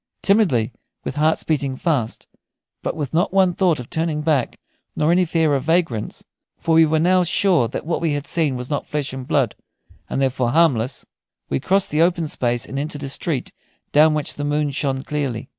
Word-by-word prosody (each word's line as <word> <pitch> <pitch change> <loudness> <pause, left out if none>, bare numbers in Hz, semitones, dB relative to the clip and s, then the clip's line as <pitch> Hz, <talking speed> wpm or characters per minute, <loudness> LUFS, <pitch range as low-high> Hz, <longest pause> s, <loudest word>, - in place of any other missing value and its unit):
Timidly, 170 - +3 0.3
with 135 - -5
hearts 155 +2 +2
beating 140 -4 -1
fast, 130 -7 -1 0.6
but - - -3
with 145 -5 -4
not 170 +3 +2
one 190 -2 +3
thought 175 -5 +2
of 125 - -7
turning 160 -1 -2
back, 150 -5 0 0.4
nor 155 +2 +2
any 180 +1 +3
fear 160 -3 +1
of 135 -1 -1
vagrants 160 -10 -1 0.3
for 165 - 0
we 160 0 +6
were 160 +1 +1
now 180 +3 +3
sure 175 -6 +2
that - - -6
what 165 +1 -1
we 165 -3 +1
had 145 0 -3
seen 155 -6 0
was 125 0 -5
not 145 - -2
flesh 145 -3 -3
and 130 -1 -7
blood, 130 -7 +1 0.6
and - - -2
therefore 130 -2 +1
harmless 130 -5 +2 0.4
we 70 - 0
crossed 195 0 +1
the 150 +2 +2
open 170 -1 +2
space 120 -4 -1
and 135 - -5
entered 145 0 -4
a 135 - -4
street 140 -1 -3 0.4
down 155 +1 +5
which 150 - -2
the 145 - -5
moon 145 0 0
shone 135 -1 -2
clearly. 140 -6 -3
150 Hz, 195 wpm, -21 LUFS, 130-165 Hz, 0.6 s, we